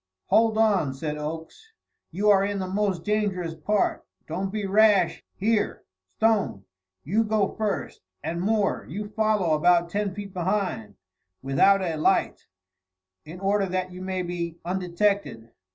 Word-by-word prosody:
"Hold 225 Hz, -1 st, +4 dB
on!" 200 Hz, -11 st, +2 dB
said 150 Hz, +2 st, -4 dB
Oakes. 165 Hz, -, -7 dB, 0.4 s
"You 205 Hz, +5 st, +2 dB
are 195 Hz, -1 st, +5 dB
in 200 Hz, 0 st, -1 dB
the 190 Hz, -, -2 dB
most 195 Hz, -3 st, -1 dB
dangerous 200 Hz, -5 st, -1 dB
part; 175 Hz, +7 st, 0 dB, 0.2 s
don't 190 Hz, +4 st, -3 dB
be 210 Hz, -1 st, -3 dB
rash. 200 Hz, -3 st, +3 dB
Here, 210 Hz, +1 st, 0 dB, 0.3 s
Stone, 210 Hz, -, +1 dB, 0.4 s
you 210 Hz, +9 st, +1 dB
go 215 Hz, -2 st, +1 dB
first 210 Hz, -4 st, -3 dB, 0.2 s
and 165 Hz, +3 st, -3 dB
Moore, 210 Hz, 0 st, +1 dB
you 205 Hz, +6 st, -5 dB
follow 215 Hz, -6 st, +1 dB
about 170 Hz, +2 st, +3 dB
ten 200 Hz, -1 st, -2 dB
feet 200 Hz, -2 st, -7 dB
behind, 185 Hz, -, -2 dB, 0.5 s
without 190 Hz, +9 st, +4 dB
a 165 Hz, -3 st, -2 dB
light, 155 Hz, -, +1 dB, 0.8 s
in 170 Hz, +4 st, -9 dB
order 195 Hz, 0 st, +1 dB
that 185 Hz, 0 st, -2 dB
you 180 Hz, +1 st, -9 dB
may 185 Hz, -1 st, -2 dB
be 170 Hz, -1 st, -4 dB
undetected. 180 Hz, -, -1 dB
190 Hz, 140 wpm, -25 LUFS, 170-210 Hz, 0.8 s, are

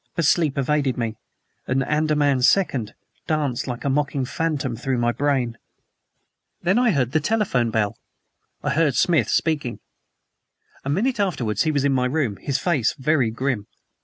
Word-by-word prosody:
But 170 Hz, -, +1 dB
sleep 155 Hz, -3 st, +2 dB
evaded 140 Hz, -1 st, +1 dB
me, 115 Hz, -2 st, -2 dB, 0.5 s
and 135 Hz, +1 st, +1 dB
"ANDAMAN 150 Hz, -2 st, +1 dB
SECOND" 130 Hz, -, +2 dB, 0.3 s
danced 145 Hz, -6 st, -1 dB
like 125 Hz, 0 st, -5 dB
a -, -, +2 dB
mocking 140 Hz, -1 st, 0 dB
phantom 145 Hz, -3 st, -2 dB
through 130 Hz, +2 st, -2 dB
my 120 Hz, 0 st, +2 dB
brain. 130 Hz, -4 st, -1 dB, 1.0 s
Then 190 Hz, +7 st, +3 dB
I 245 Hz, -1 st, +3 dB
heard 130 Hz, -, +1 dB
the 155 Hz, -, +2 dB
telephone 155 Hz, -, +1 dB
bell. 110 Hz, -1 st, -1 dB, 0.6 s
I 145 Hz, -, 0 dB
heard 145 Hz, -2 st, +2 dB
Smith 170 Hz, -3 st, +3 dB
speaking. 145 Hz, -7 st, 0 dB, 1.0 s
A 135 Hz, -, -4 dB
minute 225 Hz, -, 0 dB
afterwards 140 Hz, -, 0 dB
he 155 Hz, -, +2 dB
was 145 Hz, -2 st, 0 dB
in 140 Hz, -, +3 dB
my 125 Hz, -1 st, +1 dB
room, 130 Hz, -7 st, -1 dB
his 140 Hz, -1 st, -2 dB
face 150 Hz, -10 st, +1 dB
very 135 Hz, -3 st, +2 dB
grim. 115 Hz, -2 st, -2 dB
140 Hz, 160 wpm, -23 LUFS, 125-155 Hz, 1.0 s, Then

